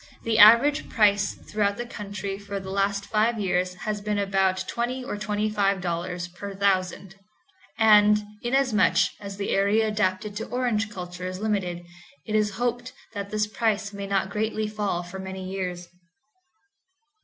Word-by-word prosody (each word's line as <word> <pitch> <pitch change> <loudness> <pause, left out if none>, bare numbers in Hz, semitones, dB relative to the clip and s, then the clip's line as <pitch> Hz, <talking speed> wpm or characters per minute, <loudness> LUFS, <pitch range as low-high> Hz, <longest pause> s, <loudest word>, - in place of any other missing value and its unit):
The 225 -1 +1
average 235 +8 +7
price 205 -3 +3
throughout 205 -1 -1
the 240 - -4
county 200 -3 -6
for 200 0 -5
the 190 0 -7
last 200 0 0
five 220 +1 +1
years 180 -2 0
has 210 +3 -4
been 210 0 -1
about 195 -2 +1
$20 250 +2 -2
or 255 - -4
$25 195 -5 -1
per 200 +2 -7
thousand; 190 -1 0 0.6
and, 210 -1 +6 0.2
inasmuch 255 -2 +2 0.2
as 200 -1 -8
the 200 - -2
area 205 +3 +3
adapted 205 -1 -1
to 220 - -4
orange 240 -4 0
culture 180 -2 -6
is 185 0 -5
limited, 190 -5 -2 0.4
it 215 - -5
is 210 -2 +1
hoped 245 +1 -2 0.2
that 200 -1 -5
this 215 0 0
price 210 -1 -1
may 200 0 -5
not 195 -1 0
greatly 215 +1 -1
fall 205 -4 -2
for 175 +2 -8
many 190 0 -6
years. 180 -2 -4
205 Hz, 150 wpm, -25 LUFS, 190-215 Hz, 0.6 s, average